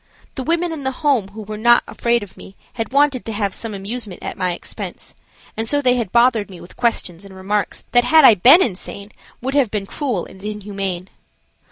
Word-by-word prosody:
The - - -5
women 335 +4 0
in 315 -3 -5
the 265 +2 -4
Home 260 -9 +3
who 215 +2 -9
were 210 +1 -7
not 240 +2 +5
afraid 235 -1 0
of 200 - -13
me 195 - -13 0.2
had 225 0 -4
wanted 280 -2 +2
to 225 - -5
have 200 -2 -1
some 225 0 -4
amusement 200 0 -6
at - - -5
my 185 -1 -1
expense, - - -7 0.4
and 225 0 -2
so 290 - +2
they 255 -3 +3
had 235 -7 -2
bothered 235 -3 +3
me 185 -3 -11
with 175 - -14
questions 200 -7 -1
and 195 -1 -12
remarks 200 +2 -2
that 245 0 +4
had 315 +5 +6
I - - +9
been 260 - +7
insane 200 -1 -6 0.3
would 265 +1 -2
have 280 -5 +3
been 205 -1 -3
cruel 240 - -2
and 190 - -14
inhumane. 195 -3 -4
220 Hz, 210 wpm, -19 LUFS, 195-255 Hz, 0.4 s, I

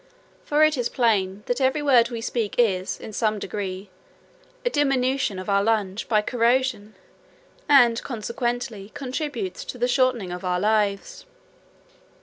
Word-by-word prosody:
For 300 +1 +2
it 310 -2 +3
is 245 -1 -1
plain, 205 -5 0
that 245 +2 -2
every 265 +3 +1
word 245 -5 +4
we 235 -2 -5
speak 225 -2 -2
is, 190 -6 +1
in 215 - -9
some 215 0 0
degree, 195 -1 -5 0.7
a - - +3
diminution 270 -6 +1
of 185 - -7
our 200 -1 +2
lungs 210 -2 0
by 215 -2 +2
corrosion, 235 -3 0 0.7
and, 240 -5 +5
consequently, 235 -2 -4
contributes 295 +7 -4
to - - -7
the 245 0 +1
shortening 250 -7 +1
of 180 +1 -6
our 180 -1 0
lives. 210 - -1
230 Hz, 140 wpm, -24 LUFS, 205-260 Hz, 0.7 s, and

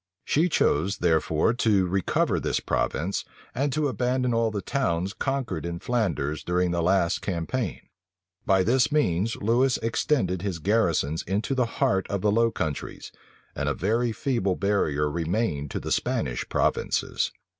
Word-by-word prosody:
She 165 +5 +2
chose 95 - +1
therefore 80 +3 +2
to 105 -6 +2
recover 95 +1 +1
this - - -1
province, 90 +5 -1 0.3
and 140 +2 0
to 155 -1 +1
abandon 125 +1 0
all 115 0 +2
the 105 -2 -4
towns 95 -8 -1
conquered 135 - -2
in 85 0 -4
Flanders 85 - -1
during 90 0 +1
the 85 0 0
last 90 -1 +2
campaign. 95 +4 -3 0.6
By 95 -1 +3
this 125 +7 +2
means 115 - +1
Lewis 120 +5 +2
extended 115 - 0
his 95 -4 -2
garrisons 85 -5 +1
into 105 +8 -1
the 125 -3 +1
heart 95 -1 +1
of 100 -2 -2
the 105 - +2
Low 115 +2 +3
Countries; 75 -9 -4 0.4
and - - -1
a - - -1
very 115 +2 0
feeble 115 -8 0
barrier 75 -8 +1
remained 80 -1 -1
to - - -3
the - - -6
Spanish - - -1
provinces. - - 0
100 Hz, 150 wpm, -26 LUFS, 85-120 Hz, 0.6 s, By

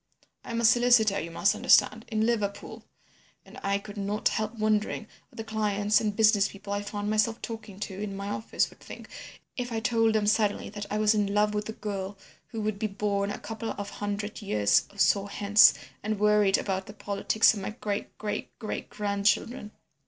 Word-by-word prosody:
I - - -11
am 230 0 -2
a 235 - +2
solicitor, 235 -3 +5
you 165 - -5
must 175 +4 +2
understand, 225 +1 +3
in 220 -1 0
Liverpool, 205 -4 -2 0.6
and - - -12
I 200 0 +1
could 205 +1 -10
not 205 +1 0
help 215 +1 -2
wondering 215 0 0 0.3
what - - -20
the 225 - -4
clients 210 -1 +1
and 210 -2 -1
business 210 -2 +4
people 200 0 -7
I 205 - -1
found 205 0 -5
myself 220 +2 +1
talking 220 -4 -7
to 195 -1 -5
in 205 -2 -4
my 200 0 -5
office 210 +2 -1
would - - -19
think - - -11 0.5
if 245 -1 -3
I 225 - -1
told 225 0 +2
them 215 -1 +2
suddenly 210 -1 +1 0.2
I 210 - -1
was 215 0 +4
in 205 -2 0
love 210 0 +3
with 210 +1 -3
a - - -4
girl 200 -2 -5 0.3
who 225 -2 -5
would 210 -1 -2
be 215 - 0
born 200 0 -1
a - - -4
couple 225 +1 -5
of 205 0 -5
hundred 205 +1 -4
years 105 - +2
or 200 - -19
so 200 0 +3
hence, 205 +1 +5 0.3
and 215 -1 -2
worried 210 -2 +4
about 190 -1 -3
the 205 - -9
politics 205 +2 +2
of 210 - -5
my 195 - -4
great 210 -2 -5
great 210 -1 -5
great 220 - -5
grandchildren. 210 +3 0
210 Hz, 195 wpm, -28 LUFS, 200-220 Hz, 0.6 s, solicitor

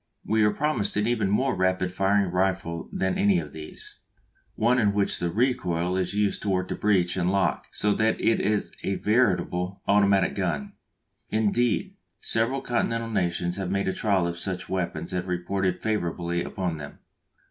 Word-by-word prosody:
We 110 0 +2
are 105 - +5
promised 115 -5 -1
an 105 - +2
even 110 -4 +1
more 130 +6 +1
rapid 95 -1 0
firing 95 0 +2
rifle 90 -2 -1
than 95 -1 -1
any 100 -2 +4
of 75 -4 -4
these, 80 -1 -10 0.6
one 120 +3 +3
in 105 -3 +3
which 100 -1 +1
the 85 - -1
recoil 90 -6 0
is 95 +1 -1
used 105 -1 +1
to 105 - -2
work 95 -1 0
the - - -2
breech 95 -5 +2
and 90 0 +1
lock 95 -1 0
so 105 0 +2
that 110 +2 +1
it 115 - +2
is 105 +1 0
a 95 - -1
veritable 95 -5 +1
automatic 100 -1 +4
gun. 85 -8 -2 0.6
Indeed, 110 +2 +1 0.2
several 120 +4 0
continental 115 -1 -1
nations 85 -2 -1
have 95 -2 -3
made 100 0 0
trial 100 -5 +1
of 85 0 -3
such 95 0 -3
weapons 95 -1 -3
and 90 0 -2
reported 90 +1 -1
favourably 85 -5 -1
upon 90 -4 -3
them. 70 0 -9
95 Hz, 170 wpm, -26 LUFS, 90-105 Hz, 0.6 s, are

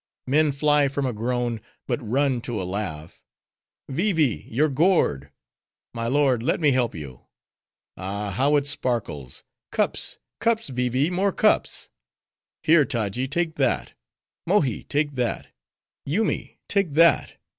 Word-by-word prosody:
Men 150 +3 +3
fly 145 0 +3
from 140 0 -2
a 125 - -1
groan; 120 0 -2 0.2
but - - -2
run 130 +2 0
to 115 -2 -3
a - - -2
laugh. 90 -5 -5 0.7
Vee 185 +10 0
Vee! 150 -8 0
your 145 +7 +2
gourd. 135 - +2 0.6
My 115 -1 -3
lord, 135 -2 +2
let 150 +8 0
me 150 -4 +4
help 125 -2 +1
you. 70 -6 -9 0.7
Ah, 100 +2 -3
how 135 +9 +2
it 145 -1 +2
sparkles! 115 - -2 0.3
Cups, - - 0 0.2
cups, 230 -6 +1
Vee 125 -1 -1
Vee, 135 +7 +1
more 195 +2 +1
cups! 215 +3 +1 0.7
Here, 160 -1 +6
Taji, 120 -2 -1
take 165 +2 -1
that: 135 -4 +1 0.5
Mohi, 155 - +1
take 145 0 0
that: 125 -3 -2 0.6
Yoomy, 205 +10 -1
take 195 -7 0
that. 165 +1 +4
135 Hz, 135 wpm, -24 LUFS, 115-155 Hz, 0.7 s, Here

